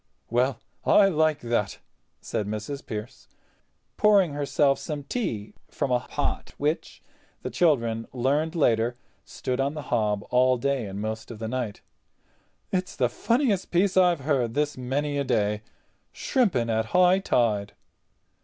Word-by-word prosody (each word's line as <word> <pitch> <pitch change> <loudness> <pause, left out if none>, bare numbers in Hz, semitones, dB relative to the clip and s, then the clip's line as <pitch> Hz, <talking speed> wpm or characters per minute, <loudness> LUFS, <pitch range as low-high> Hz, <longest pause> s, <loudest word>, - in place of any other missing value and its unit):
"Well, 125 +1 +1 0.2
I 200 -1 +5
like 155 -3 +1
that," 115 -5 -1 0.4
said 105 - -3
Mrs. 110 +7 -5
Pearce, 110 -1 -7 0.7
pouring 200 -7 +4
herself 145 -1 +1
some 150 -3 -5
tea 115 - -3 0.2
from 135 - -2
a 125 - +3
pot - - -3
which, 150 +3 -2 0.4
the - - -4
children 115 -9 +1
learned 145 +6 0
later, 120 -5 +2 0.3
stood 130 0 -4
on 140 +3 0
the 150 - -5
hob 105 -3 +1
all 125 0 +4
day 135 -3 -1
and 95 +1 -6
most 110 +1 -4
of 115 - -8
the 110 +1 -4
night; 120 -3 -3 0.9
"it's 185 -1 -2
the 125 -3 +1
funniest 230 - 0
piece 180 +2 +2
I've 180 -5 +4
heard 130 -5 0
this 150 0 0
many 140 +3 -2
a - - +1
day. 105 -5 0 0.5
Shrimping 170 - +1
at 110 0 +1
high 180 +1 +5
tide!" 110 - +1
130 Hz, 145 wpm, -26 LUFS, 115-155 Hz, 0.9 s, I